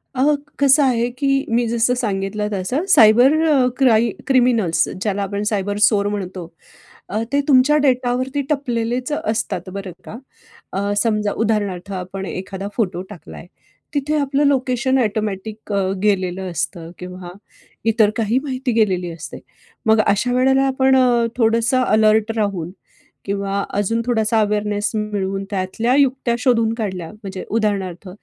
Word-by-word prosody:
अ, 255 - -1 0.4
कसं 280 +1 +5
आहे 240 -3 +1
की 280 - -1 0.2
मी 235 +1 +1
जसं 235 +2 +1
सांगितलं 210 -3 -2
तसं. 205 - -2
सायबर 245 - +6
अ, 275 -5 +3
क्राई 235 -4 +4 0.2
क्रिमिनल्स, 230 -11 +2
ज्याला 205 -1 -1
आपण 200 +1 -3
सायबर 205 -1 -2
चोर 205 -1 +3
म्हणतो. 190 -3 -5 0.6
अ, 215 +3 -2
ते 285 - +3
तुमच्या 275 +2 +5
डेटावरती 255 +1 0
टपलेलेच 250 -2 -1
अ, 295 - -1
असतात 185 -4 -3
बरं 195 -2 -6
का. - - -8 0.6
अ, 200 +1 -2
समजा 210 -3 0
उदाहरणार्थ 200 -3 -2
आपण 190 +1 -7
एखादा 195 +1 -6
फोटो 185 -6 -1
टाकला 175 - -11
आहे, - - -11 0.5
तिथे 290 +2 0
आपलं 280 0 +1
लोकेशन 260 -1 +1
ॲटोमॅटिक 215 -1 -3
अ, 200 - +1 0.2
गेलेलं 190 -2 0
असतं 170 0 -4
किंवा 180 0 -8 0.5
इतर 225 -2 +3
काही 225 +1 +1
माहिती 260 -3 -3
गेलेली 190 -6 +1
असते. 165 -1 -9 0.5
मग 220 0 +5
अशा 210 +5 +1
वेळेला 265 +1 +3
आपण 265 0 +3
अ, 245 -2 +3
थोडंसं 230 +2 +2
अलर्ट 215 -1 +3
राहून 195 -6 -2 0.5
किंवा 200 0 -2 0.2
अजून 205 +3 0
थोडासा 225 -2 +1
अवेअरनेस 210 0 0
मिळवून 200 -2 -2
त्यातल्या 205 +5 -1
युक्त्या 265 -3 +2
शोधून 230 -3 +2
काढल्या. 190 -7 -4
म्हणजे 195 -3 -8
उदाहरणार्थ 200 -4 -2
220 Hz, 140 wpm, -19 LUFS, 195-250 Hz, 0.6 s, सायबर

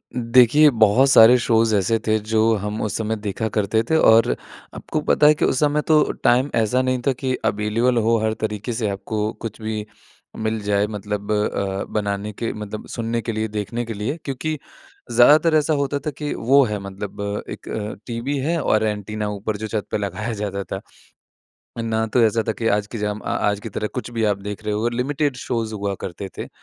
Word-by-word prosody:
देखिए, 125 +5 +5
बहुत 120 +2 +4
सारे 120 0 +8
शोज़ 115 -1 +2
ऐसे 105 +3 +2
थे 110 - +3
जो 110 +1 +2
हम 105 +1 -3
उस 105 -1 -2
समय 110 0 -1
देखा 105 +1 -3
करते 105 +1 +1
थे 160 - +3
और 115 -5 +5 0.4
आपको 155 - -3
पता 150 0 +4
है 150 - +7
कि - - +1
उस 130 - +1
समय 150 0 +2
तो 155 -1 +5 0.2
टाइम 125 +4 +3
ऐसा 115 +3 +2
नहीं 130 0 0
था - - +5
कि 130 0 -2
अवेलेबल 110 +4 +1
हो, 115 0 +3
हर 110 0 +1
तरीके 110 +2 -4
से 110 -2 -1
आपको 105 +2 -2
कुछ 115 -1 -6
भी 110 -1 -3 0.5
मिल 110 0 -1
जाए 100 0 +1
मतलब 105 0 -4
अ, 100 -2 -1
बनाने 105 0 -2
के 115 +3 -3
मतलब 105 0 -7
सुनने 115 0 -2
के 115 - -3
लिए, 110 0 -2
देखने 110 +3 -4
के 115 - -5
लिए। 105 +9 -3
क्योंकि 150 +3 -3 0.5
ज़्यादातर 155 +6 +6
ऐसा 155 0 +2
होता 140 -1 0
था 150 +2 -4
कि 150 -1 -3
वो 135 +4 +4
है 105 -3 -3
मतलब 100 +1 -5
एक - - -8
अ, 105 0 -4
टीवी 120 +4 -3
है, 165 +5 0
और 110 -5 +2
एंटीना 105 0 -2
ऊपर 105 +1 -3
जो 110 +1 -5
छत 105 -1 -3
पे - - +1
लगाया 105 +3 -3
जाता 100 -2 -3
था। 95 0 -6 1.0
ना 110 0 0
तो 120 +2 +2
ऐसा 115 +1 +2
था - - +2
कि - - 0
आज 105 - -4
की 115 +1 -7
जाम 105 0 -2
अ, - - -14
आज 105 0 0
की 115 - -6
तरह 105 +1 -3
कुछ 125 -1 -4
भी 115 -2 -1
आप 105 -2 +1
देख 105 +1 -6
रहे 105 0 -1
हो, 110 +3 0
लिमिटेड 135 +3 -1
शोज़ 115 -3 -3
हुआ 100 -1 -2
करते 95 +2 -6
थे - - -5
110 Hz, 205 wpm, -21 LUFS, 105-120 Hz, 1.0 s, सारे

